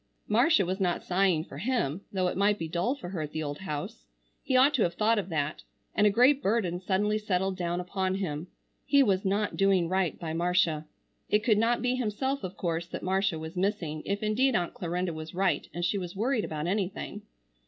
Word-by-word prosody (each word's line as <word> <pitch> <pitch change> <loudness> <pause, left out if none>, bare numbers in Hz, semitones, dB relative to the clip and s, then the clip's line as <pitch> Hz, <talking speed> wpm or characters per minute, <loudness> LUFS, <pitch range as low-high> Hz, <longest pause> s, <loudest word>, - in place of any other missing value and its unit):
Marcia 225 - +4
was 185 +3 -2
not 180 -3 0
sighing 180 -3 +2
for 145 - -10
him, 200 - -1
though 185 -2 0
it - - -2
might 205 +2 +3
be 165 - -4
dull 175 - 0
for 180 -11 -8
her 180 -4 -4
at 150 -1 -5
the 155 - -2
old 145 -1 -4
house. 150 - -6 0.3
He 260 - +1
ought 275 +3 +6
to 265 - +1
have 175 -4 +1
thought 220 +1 +3
of 195 - -5
that; 150 -2 -2 0.3
and 210 - +4
a - - +6
great 255 +7 +4
burden 195 -6 0
suddenly 205 +3 +1
settled 190 -2 0
down 175 -1 -2
upon 185 +1 -1
him. 170 -4 -3 0.4
He 280 -1 +5
was 195 -5 +1
not 200 +2 0
doing 195 -3 +3
right 185 -1 0
by 160 -2 -4
Marcia. 170 -2 +1 0.4
It 210 0 +2
could 215 -3 +3
not 230 +2 +2
be 250 +1 +1
himself 260 +4 -1
of 185 0 -6
course 170 -1 -2
that - - -6
Marcia 190 -1 +1
was 160 +2 -7
missing, 180 -5 -1
if 200 +1 -2
indeed 240 +4 +2
Aunt 175 -3 0
Clarinda 175 0 -2
was 155 +1 -7
right 190 0 +1
and 175 0 -2
she 200 +3 0
was 180 0 -6
worried 230 +2 0
about 155 0 -4
anything. 190 +1 -2
190 Hz, 215 wpm, -29 LUFS, 170-210 Hz, 0.4 s, ought